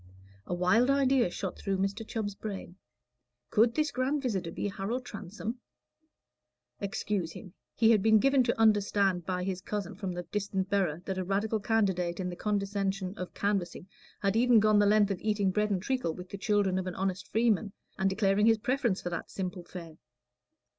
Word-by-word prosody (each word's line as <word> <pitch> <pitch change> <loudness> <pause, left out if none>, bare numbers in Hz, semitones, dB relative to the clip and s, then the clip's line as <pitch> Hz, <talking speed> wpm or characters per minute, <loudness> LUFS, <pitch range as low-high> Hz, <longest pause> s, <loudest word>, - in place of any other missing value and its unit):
A - - -2
wild 220 +8 +3
idea 270 -5 +3
shot 190 +1 -5
through 195 -1 -1
Mr. 195 +3 -1
Chubb's 210 -3 -3
brain; 195 -4 -7 0.8
could 230 +2 +4
this 305 -1 +1
grand 270 +3 -1
visitor 190 -9 -1
be 170 - -3
Harold 205 +6 -3
Transome? 215 +3 -6 1.2
Excuse 200 -4 -2
him: 185 -5 -11 0.2
he 225 0 +5
had 215 -3 +4
been 220 +1 +5
given 275 +4 +4
to 235 - 0
understand 200 -4 +3
by 180 -1 -1
his 185 -1 -3
cousin 200 -2 -4
from 190 -1 -4
the 175 0 -4
distant 195 0 -3
borough 180 -5 +1
that 190 -1 -3
a - - -1
Radical 205 +4 0
candidate 190 -5 0
in 180 -1 -2
the 175 - -5
condescension 195 -2 -1
of 180 -4 -7
canvassing 195 -3 -2 0.3
had 195 0 +1
even 240 0 +5
gone 215 0 +4
the 205 - +4
length 210 -1 +4
of 190 - -3
eating 205 -3 +1
bread 210 +2 +1
and 190 -3 -1
treacle 255 -10 -1
with 180 0 -9
the 200 - -6
children 200 -3 +1
of 185 - -4
an 180 - -4
honest 190 0 -2
freeman, 220 -3 +2 0.3
and 190 0 +3
declaring 200 +1 +2
his 225 -1 +5
preference 235 -3 0
for 175 - -3
that 175 - -4
simple 180 -2 -4
fare. 170 -3 -10
200 Hz, 185 wpm, -30 LUFS, 185-220 Hz, 1.2 s, he